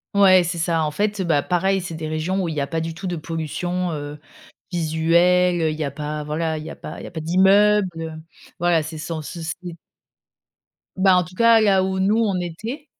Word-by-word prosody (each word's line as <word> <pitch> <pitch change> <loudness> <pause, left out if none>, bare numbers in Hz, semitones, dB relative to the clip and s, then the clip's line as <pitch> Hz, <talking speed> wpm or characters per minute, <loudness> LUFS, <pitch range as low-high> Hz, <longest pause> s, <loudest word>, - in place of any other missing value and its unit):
Ouais, 190 -2 +6
c'est 175 0 -3
ça, 165 -1 +1
en 150 - -1
fait. 205 +2 -1
Bah, 160 -4 +2
pareil 190 +4 0
c'est 170 -2 -6
des 155 -1 -5
régions 170 +5 -1
où - - -2
il 160 - -3
y 150 - -2
a 140 - -2
pas 165 -1 -2
du 165 0 -4
tout 185 +3 -6
de 175 - -2
pollution, 170 +3 -3
heu, 145 0 -6 0.5
visuelle, 170 +2 +2
heu, 155 - +1
il - - -4
y - - 0
a 140 - -2
pas 150 +2 -5
voilà 155 +1 -2
il - - -8
y - - -7
a - - -8
pas 155 - -9
il - - -9
y - - -7
a - - -11
pas 170 - -5
d'immeubles, 190 +4 +4
heu, 165 0 -5 0.5
voilà, 175 -2 +2
c'est 160 0 -7
sans 155 0 -5
soucis. 170 +2 -6 1.2
Bah, 190 -1 +4
en 180 - +3
tout 180 - -13
cas 230 0 +5
là 195 -3 +3
où 190 0 -2
nous 200 +4 +2
on 200 -5 +1
était 220 - -6
175 Hz, 230 wpm, -22 LUFS, 160-190 Hz, 1.2 s, Ouais